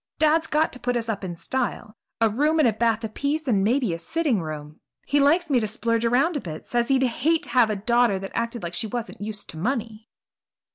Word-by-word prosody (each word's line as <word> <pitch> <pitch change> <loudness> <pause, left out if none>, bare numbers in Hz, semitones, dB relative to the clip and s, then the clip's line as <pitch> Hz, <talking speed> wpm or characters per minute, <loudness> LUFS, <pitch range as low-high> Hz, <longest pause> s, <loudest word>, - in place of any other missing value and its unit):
Dad's 315 +1 +3
got 305 +1 +1
to 255 - -3
put 245 -1 -1
us 230 -1 -3
up 205 -3 -3
in 175 -2 -4
style 240 +2 -3 0.2
a 225 - +4
room 295 +9 +1
and 305 -5 +5
a 225 - +2
bath 230 +1 +1
apiece 285 +7 -2
and 205 -6 +2
maybe 235 -2 +1
a 165 - -4
sitting 265 - 0
room. 150 -1 -7 0.3
He 290 - +2
likes 320 +5 +3
me 270 -4 +3
to 215 - -1
splurge 230 +1 -1
around 270 +9 +2
a 290 - -1
bit, 155 -3 -7
says 240 -1 0
he'd 265 -1 +3
hate 300 +6 +1
to - - -6
have 245 -4 +4
a 215 - 0
daughter 235 0 +2
that 195 0 -6
acted 230 -1 -3
like 170 0 -4
she 225 - -2
wasn't 235 -2 -5
used 210 0 -5
to - - -11
money." 225 +1 -3
235 Hz, 235 wpm, -24 LUFS, 210-275 Hz, 0.3 s, and